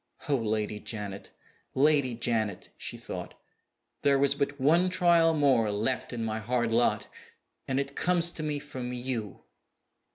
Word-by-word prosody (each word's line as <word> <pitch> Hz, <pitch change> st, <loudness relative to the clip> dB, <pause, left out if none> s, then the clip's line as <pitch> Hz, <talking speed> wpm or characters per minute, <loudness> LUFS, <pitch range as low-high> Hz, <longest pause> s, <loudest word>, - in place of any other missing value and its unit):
"Oh, 145 Hz, -, +3 dB
Lady 110 Hz, -3 st, -1 dB
Janet, 105 Hz, -3 st, -6 dB, 0.5 s
Lady 140 Hz, -3 st, +3 dB
Janet!" 110 Hz, -4 st, -2 dB
she -, -, -6 dB
thought, -, -, -7 dB, 0.7 s
"there 140 Hz, -1 st, +4 dB
was 140 Hz, 0 st, +3 dB
but 140 Hz, 0 st, -2 dB
one 165 Hz, +7 st, +4 dB
trial 170 Hz, -2 st, +4 dB
more 135 Hz, -7 st, +3 dB
left 110 Hz, +5 st, -1 dB
in 115 Hz, -2 st, -3 dB
my 110 Hz, 0 st, -2 dB
hard 120 Hz, +1 st, -1 dB
lot 120 Hz, +1 st, +2 dB, 0.6 s
and 135 Hz, 0 st, 0 dB
it 140 Hz, 0 st, -3 dB
comes 175 Hz, -1 st, +2 dB
to 160 Hz, -, -6 dB
me 150 Hz, -1 st, -2 dB
from 130 Hz, -4 st, -6 dB
_you! 120 Hz, -5 st, -4 dB
130 Hz, 150 wpm, -28 LUFS, 115-145 Hz, 0.7 s, there